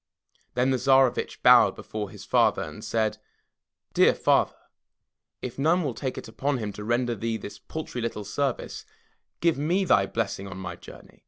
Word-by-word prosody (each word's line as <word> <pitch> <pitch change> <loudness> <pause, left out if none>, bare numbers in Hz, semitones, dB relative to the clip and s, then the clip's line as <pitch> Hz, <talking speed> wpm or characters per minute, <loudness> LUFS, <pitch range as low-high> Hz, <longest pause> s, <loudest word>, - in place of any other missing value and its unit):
Then 125 +2 +2
the 130 - +1
Tsarevitch 135 -1 +2
bowed - - +7
before 105 -2 -5
his - - -11
father - - +3
and - - -9
said: 110 -2 -1 0.7
Dear - - +5
Father! - - +2 0.9
if 125 +1 -5
none 165 +5 +3
will 140 -5 -2
take 130 +3 -4
it - - -7
upon 135 +5 -1
him 105 -4 -4
to 105 - -8
render 120 +2 0
thee 115 +1 -2
this 100 -2 -9
paltry 155 -4 -6
little 115 -3 -3
service, 140 +1 -2 0.6
give 165 -4 +2
me 175 +6 +1
thy 100 - +4
blessing 100 -3 -3
on 95 - -8
my 95 -3 -6
journey. - - -14
120 Hz, 170 wpm, -26 LUFS, 105-135 Hz, 0.9 s, bowed